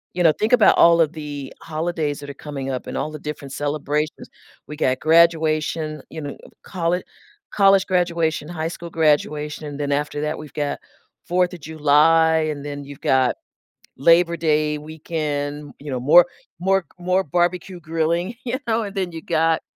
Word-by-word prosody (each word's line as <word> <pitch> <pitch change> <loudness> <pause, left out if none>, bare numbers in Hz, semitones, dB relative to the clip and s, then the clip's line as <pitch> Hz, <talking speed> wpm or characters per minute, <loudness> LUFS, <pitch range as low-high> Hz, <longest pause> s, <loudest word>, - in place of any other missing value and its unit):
you 180 - -1
know, 165 -2 +6
think 215 +9 -1
about - - +6
all 170 0 +6
of 155 -1 +2
the 145 -3 -7
holidays 160 -2 -2
that 145 0 -9
are 140 - -7
coming 140 -3 -6
up 130 -1 -4
and - - -6
all 155 - -2
the 155 - -6
different 145 -2 -7
celebrations, 150 +1 -2 0.4
we 150 - -7
got 130 -3 0
graduation, 155 -2 +2
you 160 - -6
know, 145 -1 -6 0.3
colle 180 -1 -1 0.5
college 195 -1 +4
graduation, 170 -4 0
high 165 -2 -3
school 170 0 -7
graduation, 150 -1 0
then 145 -1 -2
after 145 +1 -1
that, 150 +1 -2
we've 155 -1 -10
got 145 -2 -2 0.5
4th 180 +1 +1
of 170 - -9
July, 160 +1 +3
and 145 -1 -6
then 145 -1 -5
you've 140 0 -11
got 130 -1 +2 0.6
Labor 170 +4 +4
Day 150 -1 +1
weekend, 150 -2 -4
you 145 -1 -7
know, 125 - -2
more 165 +7 +7 0.3
more 190 +1 +2
more 185 +2 +1
barbecue 175 +3 -1
grilling, 165 +5 -1
you 255 +1 -2
know, 225 0 +1
and 200 0 -7
then 185 -3 -2
you 165 -1 -7
got, 165 -1 +1
155 Hz, 170 wpm, -22 LUFS, 145-170 Hz, 0.6 s, more